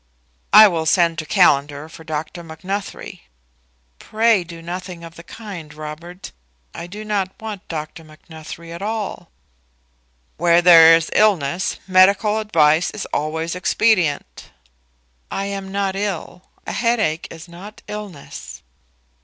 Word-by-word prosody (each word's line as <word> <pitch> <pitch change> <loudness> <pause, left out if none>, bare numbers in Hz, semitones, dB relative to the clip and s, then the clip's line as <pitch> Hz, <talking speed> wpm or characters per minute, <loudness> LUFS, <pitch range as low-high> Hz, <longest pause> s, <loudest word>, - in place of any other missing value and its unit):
"I 215 +1 +10
will 165 -4 -2
send 170 -1 +3
to 155 - -6
Callender 145 +1 +2
for 160 0 -13
Dr. 160 +2 -5
Macnuthrie." 185 +3 -7 0.7
"Pray 220 -3 +2
do 170 -1 -11
nothing 175 +1 -7
of 165 0 -10
the 170 - -12
kind, 175 -5 -9
Robert. 155 +4 -9 0.4
I 170 - -7
do 210 +4 -9
not 200 -3 -2
want 215 -3 -7
Dr. 160 0 -6
Macnuthrie 160 +1 -11
at 170 +2 -8
all." 215 0 -4 1.1
"Where 170 0 +4
there 165 -2 +8
is 165 0 -1
illness, 185 -5 +1
medical 200 +3 +4
advice 160 -6 +3
is 215 - -6
always 160 +3 -2
expedient." 180 - 0 0.8
"I 195 - -3
am 195 -1 -5
not 195 -1 -1
ill. 195 -2 -5 0.2
A - - -4
headache 215 -9 0
is 165 +1 -11
not 185 +5 -12
illness." 175 - -9
175 Hz, 130 wpm, -20 LUFS, 160-200 Hz, 1.1 s, I